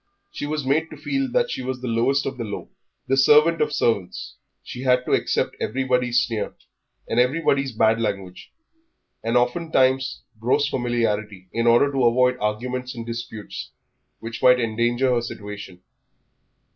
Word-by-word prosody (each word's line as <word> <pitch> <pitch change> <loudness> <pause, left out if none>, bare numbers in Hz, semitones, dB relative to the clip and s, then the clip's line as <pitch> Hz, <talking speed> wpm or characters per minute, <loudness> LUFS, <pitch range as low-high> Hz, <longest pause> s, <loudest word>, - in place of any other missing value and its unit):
She 145 - -5
was 150 -2 -2
made 155 +5 +1
to 155 - -10
feel 275 - -1
that - - +1
she - - -3
was 130 0 -4
the 125 - -5
lowest 125 +4 +1
of 135 -1 -4
the - - -2
low 105 -2 -6 0.4
the 135 - +2
servant 150 +5 +5
of - - +1
servants. 100 -6 -1 0.3
She 125 - -8
had 125 -1 +2
to - - -3
accept - - +1
everybody's 125 -2 +1
sneer 115 -3 -4 0.5
and 115 - 0
everybody's 140 +1 +2
bad 110 0 +2
language, 100 -4 -4 0.7
and 115 +2 +1
oftentimes 130 -1 +1 0.2
gross 130 +5 +2
familiarity, 110 -7 -2
in 115 0 0
order 120 +5 +5
to 135 -3 +1
avoid 125 +2 +3
arguments 125 +4 -3
and 115 -1 -6
disputes 115 -2 -7 0.5
which 115 0 -7
might 125 0 +6
endanger 120 +3 +1
her 120 - +1
situation. 105 -5 -8
125 Hz, 155 wpm, -23 LUFS, 115-135 Hz, 0.7 s, might